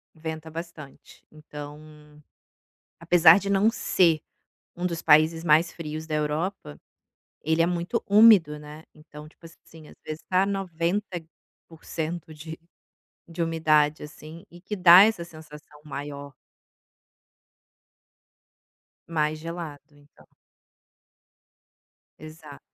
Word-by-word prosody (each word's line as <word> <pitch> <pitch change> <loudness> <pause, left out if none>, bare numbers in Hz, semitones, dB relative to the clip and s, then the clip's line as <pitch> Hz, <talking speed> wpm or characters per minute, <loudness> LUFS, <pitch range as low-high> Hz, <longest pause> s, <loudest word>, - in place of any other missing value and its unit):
Venta 160 0 -7
bastante, 165 -3 -11
então, 150 0 -13 0.8
apesar 170 +1 +6
de 200 - -4
não 200 +3 +3
ser 170 -8 +1 0.6
um 175 - -6
dos 170 -2 -4
países 160 +1 +3
mais 160 +1 +3
frios 155 -1 -7
da 155 - -4
Europa, 150 - -3 0.7
ele 160 +2 +1
é - - +2
muito 175 +6 -2
úmido, 200 -8 +5
né, 150 +1 -12
então 150 -1 -14
tipo 165 - -25
assim 165 -1 -17
às - - -16
vezes 155 +1 -7
está 185 +1 +1
90% 170 -3 -5
de 160 +1 -10 0.7
de 170 0 -2
umidade, 155 -2 +1
assim, 155 +2 -12
e 175 - -15
que 200 +4 -6
dá 180 0 +8
essa 215 -5 0
sensação 155 -2 -14
maior. 140 -1 -8 2.7
Mais 155 -2 -1
gelado 165 -3 -7
então. 145 0 -23 1.9
Exato. 155 -2 -12
160 Hz, 105 wpm, -25 LUFS, 150-170 Hz, 2.7 s, dá